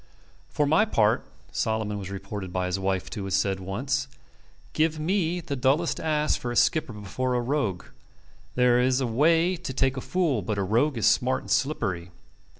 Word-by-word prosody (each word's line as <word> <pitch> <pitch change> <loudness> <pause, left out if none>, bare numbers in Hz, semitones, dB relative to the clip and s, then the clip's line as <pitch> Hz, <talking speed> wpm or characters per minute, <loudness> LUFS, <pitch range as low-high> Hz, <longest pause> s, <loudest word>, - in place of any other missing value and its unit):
"For 150 - +1
my 160 +8 +4
part," 110 - +2 0.3
Solomon 110 -2 -1
was 95 -1 -6
reported 100 -1 -6
by 90 0 -1
his 90 +1 -2
wife 95 -1 -1
to 105 -4 -5
have 95 - -4
said 95 -1 +1
once, 130 +9 -2 0.7
"give 155 0 +1
me 175 +1 0
the 155 -4 -4
dullest 140 +6 +1
ass 150 -1 +1
for 120 - -4
a - - -4
skipper 155 +1 +2
before 125 +5 -3
a - - +2
rogue. 120 - -1 0.7
There 125 -1 +4
is 130 +1 +2
a 130 - 0
way 165 +9 +3
to 130 - -6
take 130 +1 +1
a - - -2
fool; 160 - 0
but 100 +3 -3
a 100 - 0
rogue 120 +8 +1
is 110 - 0
smart 130 0 +3
and - - -8
slippery." 100 - 0
125 Hz, 185 wpm, -26 LUFS, 100-150 Hz, 0.7 s, my